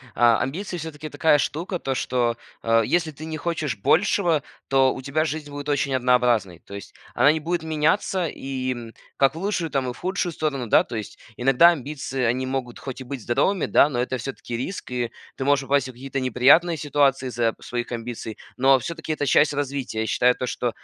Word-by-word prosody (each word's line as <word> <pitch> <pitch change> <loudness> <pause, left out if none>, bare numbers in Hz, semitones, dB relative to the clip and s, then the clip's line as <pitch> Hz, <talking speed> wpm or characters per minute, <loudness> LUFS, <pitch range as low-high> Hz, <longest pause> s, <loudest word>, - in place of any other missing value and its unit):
а, 120 -1 +5
амбиции 175 +9 -3
всё-таки 155 -2 -7
такая 145 +1 +3
штука. 170 +6 -2
То, 135 -5 -2
что, 120 -2 0 0.3
э, 115 0 +3
если 170 +2 +1
ты 155 +2 -9
не 160 0 -5
хочешь 155 -6 -2
большего, 165 - +2 0.3
то 135 -1 +4
у - - -7
тебя 145 +4 0
жизнь 155 -2 -4
будет 145 0 -7
очень 140 -1 0
однообразной. 125 -8 +2
То 100 - -14
есть 100 -2 -9 0.2
она 145 - +5
не 160 - -3
будет 170 +1 -2
меняться 160 +3 +1
и, 130 -3 -4
м, 120 -2 -7 0.2
как 135 +2 +3
в - - -6
лучшую, 185 -4 -1
там 135 -2 0
и - - -4
в - - -15
худшую 185 -1 -2
сторону. 145 -6 -2
Да, - - +5
то - - -7
есть 110 -2 -6 0.2
иногда 135 +8 +5
амбиции- 140 -3 -4
они 125 +2 +1
могут 130 -2 -4
хоть 135 -1 -7
и - - -5
быть 130 0 -6
здоровыми, 170 - +1
да, 145 - +4
но 125 -4 -2
это 130 +1 -1
всё-таки 125 -1 -6
риск, 130 +12 -5
и 120 -2 -2 0.2
ты - - -4
можешь 140 0 +2
попасть 135 -1 +1
в - - -7
какие-то 135 +2 -5
неприятные 135 +7 +4
ситуации 140 -3 +1
из-за 115 -2 0
своих 120 0 -4
амбиций. 115 -2 -5 0.2
Но 135 +1 +5
всё-таки 160 +3 -5
это 145 - -2
часть 145 +3 +4
развития. 140 -5 -3
Я - - -1
считаю 125 +3 +3
то, - - -3
что, 125 - -1
135 Hz, 205 wpm, -24 LUFS, 125-155 Hz, 0.3 s, а